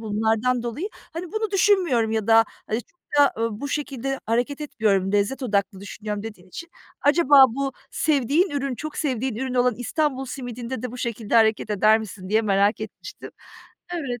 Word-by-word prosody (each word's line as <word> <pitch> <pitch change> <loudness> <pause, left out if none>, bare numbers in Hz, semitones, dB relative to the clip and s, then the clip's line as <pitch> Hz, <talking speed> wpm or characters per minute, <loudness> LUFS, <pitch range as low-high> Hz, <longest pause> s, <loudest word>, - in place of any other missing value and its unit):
bunlardan 225 +3 0
dolayı, 240 - -4 0.2
hani, 335 +1 -6
"Bunu 435 -1 -1
düşünmüyorum 370 - +3
ya 220 -2 -1
da, 225 0 +6 0.2
hani, 220 +2 -1
çokta, 290 -6 0
ııı, 225 -1 -2
bu 285 - -4
şekilde 270 -2 -3
hareket 245 +6 0
etmiyorum, 205 -9 0
lezzet 205 +7 0
odaklı 200 -4 -1
düşünüyorum." 210 +1 -5
dediğin 210 -5 -9
için 335 - -9 0.3
acaba 290 -2 +6
bu 275 0 -2 0.2
sevdiğin 300 - +1
ürün, 275 -2 -2
çok 310 +5 -7
sevdiğin 260 -4 -1
ürün 260 +1 -3
olan 250 -1 +3
İstanbul 270 +3 -1
simidinde 245 -2 -6
de 250 -1 -4
bu 250 - -8
şekilde 230 -3 -3
hareket 220 -1 +3
eder 215 +2 +4
misin 195 -3 -8
diye 220 +3 +2
merak 200 +1 +2
etmiştim. - - -9 0.6
Evet. 255 -8 -4
245 Hz, 165 wpm, -24 LUFS, 220-280 Hz, 0.6 s, da